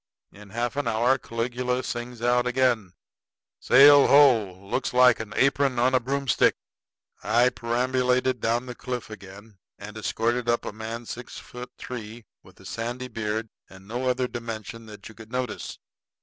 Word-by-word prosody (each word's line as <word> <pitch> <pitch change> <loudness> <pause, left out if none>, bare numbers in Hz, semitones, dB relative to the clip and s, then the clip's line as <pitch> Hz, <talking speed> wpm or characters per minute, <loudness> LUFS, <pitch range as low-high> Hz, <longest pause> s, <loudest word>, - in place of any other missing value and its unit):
In 105 0 -15
half 120 +4 -3
an 145 - -1
hour 120 +4 +2
Caligula 125 +2 -2
sings 120 -1 -6
out 125 0 +2
again: 125 -7 +1 0.7
"Sail 140 +2 +7
ho! 130 -9 +5
Looks 125 +4 -2
like 125 -2 +6
an 110 -1 -6
apron 135 -1 +2
on 125 +2 +2
a 130 - +4
broomstick." 135 -1 +1 0.7
I 120 +3 +3
perambulated 125 +1 0
down 120 +2 0
the 125 - -7
cliff 125 -2 -6
again, 100 0 -12 0.2
and 105 +1 -10
escorted 120 +2 -1
up 120 - +1
a - - -4
man 110 +2 -7
six 120 +2 -8
foot 125 0 -9
three, 115 -2 -8 0.2
with - - -20
a - - -16
sandy 120 +3 -5
beard 110 -1 -3 0.2
and 95 0 -15
no 125 +4 -2
other 125 0 0
dimension 115 -1 -7
that 105 -1 -11
you 115 - -12
could 110 0 -14
notice. 125 -3 -4
120 Hz, 160 wpm, -25 LUFS, 110-125 Hz, 0.7 s, Sail